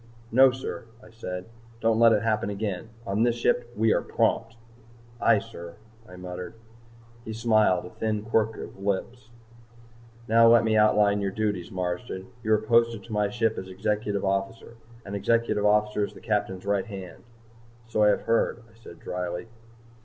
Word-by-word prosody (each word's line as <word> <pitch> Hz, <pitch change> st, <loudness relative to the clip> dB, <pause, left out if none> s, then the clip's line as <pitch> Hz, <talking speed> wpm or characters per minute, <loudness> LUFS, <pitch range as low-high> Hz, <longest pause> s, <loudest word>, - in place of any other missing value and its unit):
"No, 130 Hz, +3 st, +7 dB
sir," 130 Hz, -2 st, -6 dB, 0.2 s
I 110 Hz, -, -15 dB
said. 90 Hz, -5 st, -6 dB, 0.3 s
"Don't 115 Hz, -1 st, +2 dB
let 115 Hz, -1 st, +7 dB
it 105 Hz, -1 st, +2 dB
happen 110 Hz, -3 st, 0 dB
again. 100 Hz, 0 st, -4 dB, 0.2 s
On 100 Hz, +2 st, -1 dB
this 120 Hz, 0 st, +3 dB
ship 120 Hz, 0 st, 0 dB
we 110 Hz, +1 st, +3 dB
are -, -, +1 dB
prompt." 115 Hz, 0 st, 0 dB, 0.6 s
"Aye, -, -, +4 dB
sir," 85 Hz, -6 st, -8 dB, 0.3 s
I 90 Hz, -, -11 dB
muttered. 90 Hz, +3 st, -7 dB, 0.7 s
He 110 Hz, -, -6 dB
smiled, 110 Hz, -5 st, +2 dB
a 90 Hz, -, -10 dB
thin 110 Hz, -2 st, -2 dB
quirk 110 Hz, 0 st, 0 dB
of -, -, -7 dB
thin 95 Hz, -, -13 dB
lips. 110 Hz, +4 st, -3 dB, 1.0 s
"Now 115 Hz, +1 st, +6 dB
let 115 Hz, 0 st, +6 dB
me 110 Hz, -1 st, +1 dB
outline 105 Hz, -1 st, +4 dB
your 100 Hz, -, 0 dB
duties, 105 Hz, -3 st, -2 dB
Marsden. 90 Hz, +2 st, -4 dB
You 110 Hz, -1 st, +1 dB
are -, -, +5 dB
posted 115 Hz, 0 st, +2 dB
to 115 Hz, -, -9 dB
my 105 Hz, -1 st, +1 dB
ship 115 Hz, 0 st, 0 dB
as 95 Hz, -, -8 dB
Executive 100 Hz, +1 st, -2 dB
Officer. 95 Hz, +4 st, -2 dB, 0.3 s
An 100 Hz, -, -7 dB
Executive 105 Hz, 0 st, +1 dB
Officer 105 Hz, 0 st, +2 dB
is -, -, -4 dB
the -, -, -13 dB
Captain's 105 Hz, -4 st, -2 dB
right 100 Hz, +1 st, 0 dB
hand." 95 Hz, -4 st, -9 dB, 0.7 s
"So 110 Hz, -2 st, -1 dB
I 105 Hz, -, +6 dB
have 105 Hz, -, +3 dB
heard," 115 Hz, +1 st, 0 dB
I -, -, -23 dB
said -, -, -12 dB
drily. 90 Hz, +3 st, -5 dB
105 Hz, 175 wpm, -26 LUFS, 100-115 Hz, 1.0 s, No